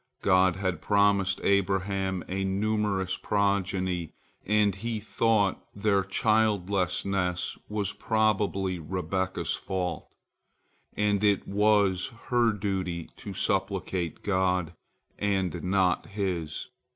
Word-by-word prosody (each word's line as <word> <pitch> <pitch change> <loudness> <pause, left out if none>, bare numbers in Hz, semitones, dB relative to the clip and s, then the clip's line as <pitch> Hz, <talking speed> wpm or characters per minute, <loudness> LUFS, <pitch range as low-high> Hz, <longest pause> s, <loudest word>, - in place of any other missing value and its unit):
God 95 -1 +4
had 95 -4 -2
promised 100 -2 +2
Abraham 95 -1 +1
a 95 +1 -2
numerous 100 -1 0
progeny, 95 -4 0 0.3
and 105 -1 +3
he 110 +3 -3
thought 110 -1 +1
their 100 -1 +2
childlessness 100 -3 +1
was 105 -1 -2
probably 105 -5 0
Rebekah's 95 +3 -2
fault, 90 -2 -3 0.9
and 105 -1 +1
it 100 -2 +2
was 100 -2 +3 0.2
her 120 -2 +4
duty 95 -4 -3
to - - -8
supplicate 85 -4 -1
God, 90 -3 +1 0.5
and 95 -4 -1
not 95 -1 +1
his. 95 -4 -3
95 Hz, 95 wpm, -28 LUFS, 95-105 Hz, 0.9 s, God